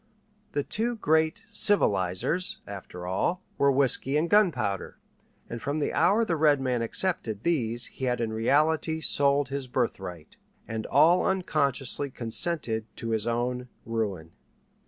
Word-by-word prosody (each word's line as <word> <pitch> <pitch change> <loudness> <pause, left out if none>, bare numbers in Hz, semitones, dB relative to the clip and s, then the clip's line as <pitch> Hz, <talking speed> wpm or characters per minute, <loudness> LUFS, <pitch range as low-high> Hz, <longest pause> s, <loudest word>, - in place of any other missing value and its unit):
The 145 - 0
two 235 - -1
great 160 0 +1
"civilizers," 105 - +1
after 90 -3 -8
all, 170 - -1 0.2
were 140 0 +4
whiskey 135 +1 +2
and 160 +3 +1
gunpowder, 140 - +1 0.5
and 120 -1 -6
from 140 +2 -2
the 150 - -1
hour 220 +4 +3
the 170 - 0
red 150 -2 +3
man 125 -3 -1
accepted 115 - -1
these 120 -8 0
he 130 - -6
had 125 -1 0
in 115 -2 -2
reality 155 +7 +1
sold 140 -3 +3
his 140 -1 -3
birthright, 95 -10 -4 0.3
and 110 -1 -4
all 160 +5 +5
unconsciously 145 -7 0
consented 120 -2 -2
to 115 - -5
his 110 0 0
own 125 +1 -2 0.2
ruin. 100 -8 -3
135 Hz, 135 wpm, -27 LUFS, 115-160 Hz, 0.5 s, all